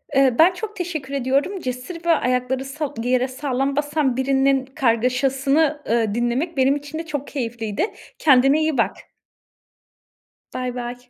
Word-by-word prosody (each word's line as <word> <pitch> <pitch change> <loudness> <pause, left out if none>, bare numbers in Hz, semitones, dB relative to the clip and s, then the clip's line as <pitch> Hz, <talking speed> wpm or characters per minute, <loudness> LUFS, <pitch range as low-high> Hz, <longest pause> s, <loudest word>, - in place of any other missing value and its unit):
Eee, 265 -3 +4
ben 345 +3 +7
çok 425 +3 -6
teşekkür 315 -7 -4
ediyorum. 275 +8 0
Cesur 260 +6 -6
ve - - 0
ayakları 255 -2 0
sa 290 +1 -4
yere 255 +1 +2
sağlam 270 +1 -2
basan 290 -3 0
birinin 270 0 +2
kargaşasını, 270 +4 +1
ııı, 225 -2 +1
dinlemek 250 +7 -1
benim 265 +1 +4
için 290 +2 -6
de 330 - -5
çok 290 -3 -4
keyifliydi. 230 - -3 0.3
Kendine 275 +1 +5
iyi 310 -3 0
bak. 230 - +1 1.6
Baybay. 245 -1 -5
270 Hz, 135 wpm, -22 LUFS, 250-295 Hz, 1.6 s, ben